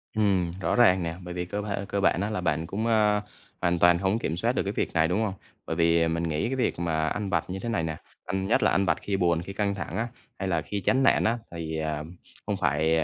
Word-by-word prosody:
Ừm, 95 -5 +2
rõ - - +1
ràng 95 -7 +5
nè, 85 0 -3
bởi 90 0 -6
vì 90 0 -3
cơ 105 +3 -3
ba 100 -1 -2
cơ 100 - -1
bản 90 - +3
á 100 - -1
là 105 -4 -2
bạn 80 -1 0
cũng, 105 +5 -2
a, 105 -2 +3 0.4
hoàn 85 -1 +1
toàn 85 0 +6
hông 95 +4 +1
kiểm 80 -6 -2
soát 115 +6 +1
được - - 0
cái 100 - -3
việc - - -1
này, 80 -1 +3
đúng 90 +6 0
hông? 105 -3 -1 0.3
Bởi 80 - -3
vì, 85 0 +3
à, 85 - +3
mình 85 +1 -1
nghĩ 80 +4 -1
cái 135 - -1
việc 130 - 0
mà 80 -2 0
ăn 105 +4 -2
vặt 85 -4 +1
như 95 +1 -4
thế 120 - -4
này 100 -8 0
nè, 80 -1 -3 0.3
ăn 95 +1 -2
nhất 110 - +3
là - - +4
ăn 95 - +2
vặt - - +2
khi 100 -1 -1
buồn 85 -3 +2
khi 95 +3 -7
căng 100 0 0
thẳng 95 - -5
á, 115 - 0 0.3
hay 95 - -2
là 85 -4 +1
khi 100 +6 -4
chán 130 +7 +2
nản - - +4
á 115 +2 +2
thì, 80 -2 -4
à, 75 -1 -2 0.4
không 105 -1 -1
phải, 80 +1 +2
à, 80 - +2
90 Hz, 285 wpm, -27 LUFS, 85-105 Hz, 0.4 s, toàn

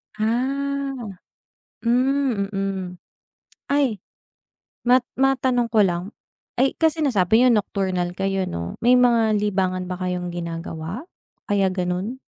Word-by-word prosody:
Ah! 275 +5 -1 0.9
Hmm, 250 -3 +1
mhm. 195 -1 -2 0.9
Ay, 280 -6 +2 0.9
ma 250 +1 +7 0.2
matanong 260 -2 +2
ko 220 -2 +5
lang, 175 -2 0 0.6
ay, 265 +2 +3
kasi 320 -1 +2
nasabi 220 -6 +3
niyo 250 - +6
nocturnal 185 -4 -1
kayo 195 -1 -1
'no. 85 0 -5
May 245 +2 +5
mga 230 -3 +4
libangan 190 -3 0
ba 180 - -3
kayong 180 -1 -2
ginagawa, 165 - -5 0.4
kaya 200 -2 +2
gano'n? 185 +6 -2
210 Hz, 110 wpm, -23 LUFS, 185-255 Hz, 0.9 s, ma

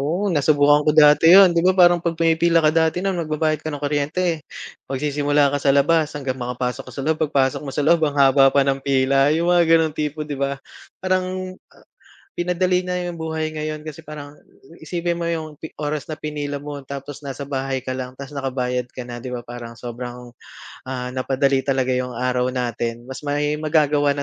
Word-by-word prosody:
oo 170 +9 -1
nasubukan 145 0 +4
ko 150 - +3
dati 150 +1 +6
'yon 185 -1 +8
'di 170 - +2
ba 185 - +5
parang 175 -2 +5
pag 165 -1 -2
pumipila 165 0 +3
ka 155 -2 +4
dati 160 +1 +2
nung 190 +1 -1
magbabayad 155 -1 -1
ka 155 - -4
ng 145 - -5
kuryente, 150 +3 -1 0.5
magsisimula 145 +1 +1
ka 145 - 0
sa 140 - +3
labas 150 +3 +3
hanggang 135 -3 -3
makapasok 125 0 -3
ka - - -14
sa 140 - -5
loob 160 0 +1
pagpasok 135 -3 +1
mo 140 - -6
sa 145 +2 -2
loob 170 0 +4
ang 145 -2 0
haba 135 0 +6
pa 140 0 +2
ng 135 0 0
pila 135 +1 +2
'yong 165 +3 +1
mga 175 -1 +4
ganong 160 -2 +4
tipo 150 0 -3
'di 150 - -4
ba? 140 0 -2 0.4
Parang, 185 0 -2 0.2
ah - - -23 0.5
pinadali 180 +1 +1
na 180 - -2
'yong 175 -1 -5
buhay 160 -1 -3
ngayon 155 0 -4
kasi 155 +1 -8
parang 145 -1 -9 0.5
isipin 170 +2 -2
mo 170 - -3
'yong 160 -2 -4 0.3
oras 150 -1 -2
na 155 - -3
pinila 145 -1 -4
mo 145 0 -6
tapos 140 +1 -8
nasa 140 +1 -6
bahay 135 -1 -3
ka 130 - -2
lang 130 0 -6
ta's 140 0 -8
nakabayad 125 -3 -2
ka 130 - -8
na 120 0 -7
'di 125 - -6
ba 120 - -4
parang 120 -1 -8
sobrang, 120 0 -8 0.5
ah, 125 -1 -4
napadali 135 +1 +1
talaga 130 -2 +1
'yong 125 -1 -3
araw 125 +1 0
natin, 120 -1 -3
mas 130 - -7
may 145 +1 0
magagawa 150 -2 +2
na 140 - -3
145 Hz, 200 wpm, -21 LUFS, 135-160 Hz, 0.5 s, yon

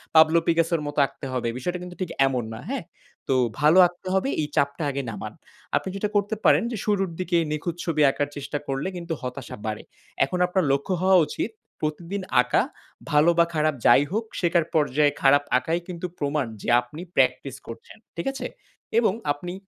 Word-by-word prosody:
Pablo 160 +1 +7
পিকাসের 165 -1 +2
মত 145 - -5
আঁকতে 135 - -9
হবে, 125 -2 -1
বিষয়টা 180 +8 -3
কিন্তু 180 0 -9
ঠিক 185 - -2 0.2
এমন 125 -3 -1
না, 110 - -7
হ্যাঁ? 270 -5 -2 0.4
তো - - +2 0.3
ভালো 155 +4 +5
আঁকতে 175 +1 -14
হবে 190 +8 +1
এই 150 - -1
চাপটা 140 +3 +1
আগে 140 0 -2
নামান। 105 - -7 0.4
আপনি - - 0
যেটা 205 +1 -1
করতে 205 +2 +1
পারেন - - +5
যে 230 - -3
শুরুর 195 -3 +1
দিকে 180 -1 +1
নিখুঁত 155 +3 -2
ছবি 155 -3 0
আঁকার 145 - -1
চেষ্টা 145 +1 -4
করলে 135 +6 -2
কিন্তু 170 -1 -4
হতাশা 125 0 -6
বাড়ে। 110 -1 -3 0.4
এখন 180 +7 -3
আপনার 185 +1 +1
লক্ষ্য 140 +7 0
হওয়া 190 0 +5
উচিত 205 - -3 0.3
প্রতিদিন 170 +6 -3 0.2
আঁকা, 125 - +2 0.5
ভালো 150 +3 +5
বা 170 - +7
খারাপ 155 -1 +1
যাই 125 +4 +7
হোক 220 +3 0 0.2
শেখার 170 -2 +2
পর্যায়ে 145 -1 +3
খারাপ 145 +1 +5
আঁকাই 165 +6 -1
কিন্তু 180 0 -5
প্রমাণ 145 -1 0 0.2
যে - - -4
আপনি 125 +7 -10
প্র্যাকটিস 130 0 +1
করছেন, 115 - -10 0.2
ঠিক 170 - -3
আছে? 270 - -4 0.5
এবং 220 -5 +2 0.2
আপনি 175 +5 -5
160 Hz, 185 wpm, -25 LUFS, 140-180 Hz, 0.5 s, Pablo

